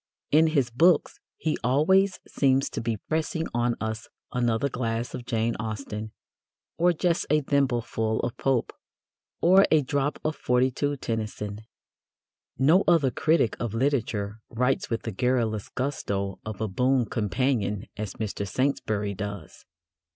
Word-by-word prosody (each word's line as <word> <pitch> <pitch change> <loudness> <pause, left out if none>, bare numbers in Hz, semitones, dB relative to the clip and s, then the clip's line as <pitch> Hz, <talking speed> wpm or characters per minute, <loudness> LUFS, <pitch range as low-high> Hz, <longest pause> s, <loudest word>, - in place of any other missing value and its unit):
In 160 +2 +6
his 140 -6 +1
books 165 +9 +3 0.2
he 155 - -1
always 185 +10 +3
seems 135 -1 +2
to - - -3
be 115 -1 -1
pressing 160 +1 -1
on 120 0 +1
us 110 -1 -4 0.2
"another 120 +1 +1
glass 120 -2 -3
of 120 - -7
Jane 115 -1 0
Austen," 110 -1 -5 0.7
or 175 +1 +5
"just 170 0 0
a 150 0 +3
thimbleful 120 -6 0
of 120 - -3
Pope," 135 -3 0 0.7
or 190 +3 +6
"a 155 -2 +4
drop 145 +2 -1
of 155 0 0
'42 130 +3 +1
Tennyson." 105 -3 -4 1.0
No 155 - +5
other 160 -7 +4
critic 155 -2 +2
of 115 -2 -3
literature 115 -5 -1
writes 125 +3 0
with 115 - -2
the 115 - -3
garrulous 115 -2 0
gusto 100 -8 -3
of 110 -3 -6
a 110 - 0
boon 125 +5 +2
companion 105 -1 -1
as 105 -2 -5
Mr. 100 -2 -3
Saintsbury 105 -4 -1
does. 100 +1 -7
125 Hz, 135 wpm, -26 LUFS, 110-140 Hz, 1.0 s, In